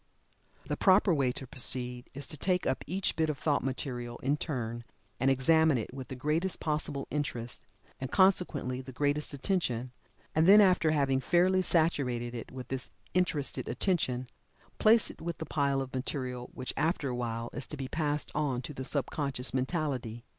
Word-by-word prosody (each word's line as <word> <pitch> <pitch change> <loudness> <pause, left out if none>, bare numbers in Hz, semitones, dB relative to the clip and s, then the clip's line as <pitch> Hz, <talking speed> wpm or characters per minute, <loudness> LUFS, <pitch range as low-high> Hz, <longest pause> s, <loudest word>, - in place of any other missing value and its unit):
The - - -2
proper 190 -1 +5
way 135 -5 +2
to 135 - -7
proceed, 125 -1 -2
is 140 0 -3
to - - -2
take 180 +4 0
up 130 - 0
each 185 +5 0
bit 160 -1 +1
of 150 - -2
thought 145 +1 +1
material 125 -2 -3
in 140 +3 +2
turn, 120 -7 -3 0.4
and 130 +2 +3
examine 155 +2 +4
it 115 +1 -4
with 130 -1 -7
the 130 - -6
greatest 155 +8 0
possible 150 -2 -2
interest, 125 -5 -3 0.3
and 130 - -4
consequently 175 -9 +3
the 130 0 -9
greatest 145 +3 0
attention, 130 - -1 0.4
and 160 +2 +3
then 205 +2 +9
after 185 -5 +5
having 140 -3 +2
fairly 180 +6 +3
saturated 135 -9 +1
it 115 - -7
with 130 -1 -8
this 130 -1 -3 0.2
interested 165 -6 0
attention, 130 -10 0 0.5
place 225 +1 +5
it - - -16
with 170 0 -4
the 160 - -5
pile 140 -3 +1
of 130 - -10
material 130 -1 -3
which, 130 - -4
after 155 -2 0
a 125 - -2
while, 115 -1 -3
is 130 - -5
to 150 - -4
be 135 -1 -4
passed 150 0 -1
on 135 -5 -1
to 150 - -6
the 130 - -5
sub 140 -2 -1
conscious 140 -4 -2
mentality. 130 -5 -2
140 Hz, 180 wpm, -31 LUFS, 125-160 Hz, 0.5 s, then